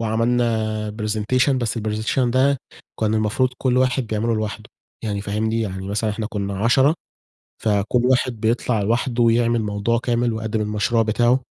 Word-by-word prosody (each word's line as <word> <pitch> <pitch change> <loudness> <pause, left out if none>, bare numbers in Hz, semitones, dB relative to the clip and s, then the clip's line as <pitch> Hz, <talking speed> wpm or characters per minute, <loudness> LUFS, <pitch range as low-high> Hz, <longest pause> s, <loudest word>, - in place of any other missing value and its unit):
وعملنا 110 -2 0
presentation، 110 +6 +1
بس 120 -3 -1
الpresentation 110 +3 -2
ده 130 +3 +2 0.4
كان 110 0 +1
المفروض 110 +4 +1
كل 125 -2 +1
واحد 130 -1 +2
بيعمله 110 +2 0
لوحده، 110 0 -3 0.4
يعني 100 -2 -2
فاهمني؟ 110 +3 -1
يعني 95 -3 -4
مثلًا 105 +2 -1
إحنا 105 +1 -3
كنا 100 -2 -4
10، 130 +7 +4 0.7
فكل 105 +3 +2
واحد 125 -3 +1
بيطلع 115 0 +1
لوحده 120 +3 0
ويعمل 115 0 +3
موضوع 105 +3 0
كامل 120 -1 0
ويقدّم 110 0 -2
المشروع 105 +2 +1
بتاعه. 120 +4 +2
110 Hz, 145 wpm, -21 LUFS, 105-120 Hz, 0.7 s, 10